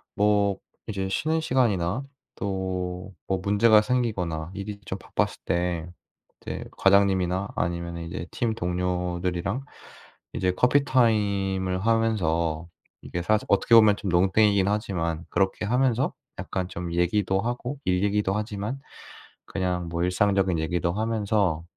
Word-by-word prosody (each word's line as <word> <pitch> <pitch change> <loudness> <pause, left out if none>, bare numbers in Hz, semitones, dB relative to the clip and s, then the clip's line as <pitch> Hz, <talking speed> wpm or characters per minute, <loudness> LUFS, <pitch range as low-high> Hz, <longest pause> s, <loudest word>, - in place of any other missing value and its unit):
뭐 100 -1 +2 0.3
이제 100 -3 -2
쉬는 160 +10 0
시간이나 120 - +1 0.3
또 95 -2 -2 0.5
뭐 95 - +1
문제가 105 +2 +5
생기거나 95 -10 -1
일이 100 +1 -6
좀 95 - -4
바빴을 - - -2
때 85 -1 -1 0.5
이제 - - -5
과장님이나 95 -1 +3
아니면은 85 0 -3
이제 85 - -5
팀 115 -2 -1
동료들이랑 90 +3 -2 0.7
이제 95 0 +1
커피타임을 100 -7 +2
하면서 85 -8 +1 0.3
이게 90 - -4
사실 110 +3 +1
어떻게 100 +3 +4
보면 110 -2 +7
좀 100 - -4
농땡이긴 95 +2 +3
하지만 90 -6 -1
그렇게 95 +1 0
하면서 125 +2 +1 0.3
약간 95 -1 -3
좀 85 -1 -5
얘기도 95 +3 +1
하고 120 +4 -3
일 90 - +2
얘기기도 100 -1 +1
하지만 105 +4 -3 0.7
그냥 90 -2 -2
뭐 85 +1 -1
일상적인 95 -1 +2
얘기도 85 +2 0
하면서 105 -5 0
95 Hz, 290 characters per minute, -26 LUFS, 90-110 Hz, 0.7 s, 보면